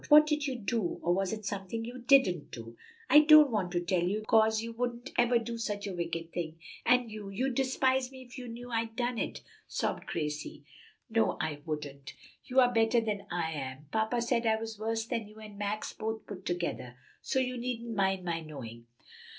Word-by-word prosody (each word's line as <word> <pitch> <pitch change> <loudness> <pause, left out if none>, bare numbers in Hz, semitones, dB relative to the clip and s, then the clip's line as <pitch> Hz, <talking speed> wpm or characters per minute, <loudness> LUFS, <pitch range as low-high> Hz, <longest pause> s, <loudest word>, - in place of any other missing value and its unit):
What 300 0 +9
did 300 -1 0
you 265 - -2
do? 225 -4 -1
or 175 - +3
was 195 0 0
it 215 -1 -5
something 200 +3 -3
you 245 +2 -7
didn't 240 - +4
do?" 115 -1 -9 0.3
"I 295 - +9
don't 305 -2 +8
want 195 -5 0
to 175 - +2
tell 175 0 +1
you, 200 +5 0
'cause 220 0 +4
you 230 +1 -5
wouldn't 245 +2 -3
ever 240 0 +4
do 230 0 -4
such 205 -2 -3
a 200 - -4
wicked 170 -1 -4
thing, 165 -2 -4 0.3
and 250 -2 +4
you 210 -2 -7
you'd 255 +7 -1
despise 260 0 +1
me 260 -1 -10
if 250 0 -14
you 255 -2 -7
knew 240 +1 -8
I'd 225 -1 -1
done 245 -1 -1
it," - - -3 0.3
sobbed - - -2
Gracie. 150 -2 -4 0.4
"No, 225 -2 +1
I 150 -2 -2
wouldn't. 145 -3 -5 0.3
You 260 0 +2
are 245 -1 +4
better 225 +1 +4
than 205 -3 -3
I 170 -2 -1
am. 135 -1 -5
Papa 220 +2 +1
said 235 -1 +1
I 220 - +4
was 225 -1 -6
worse 225 +1 -1
than 230 -3 -3
you 210 - -15
and 210 -2 -11
Max 205 +1 -2
both 220 0 -4
put 190 -2 -8
together. 170 -8 -3 0.3
So - - -1
you 255 -1 +1
needn't 235 -2 -3
mind 190 -2 +1
my 170 -1 -1
knowing." 120 -7 -9
220 Hz, 205 wpm, -31 LUFS, 175-245 Hz, 0.4 s, What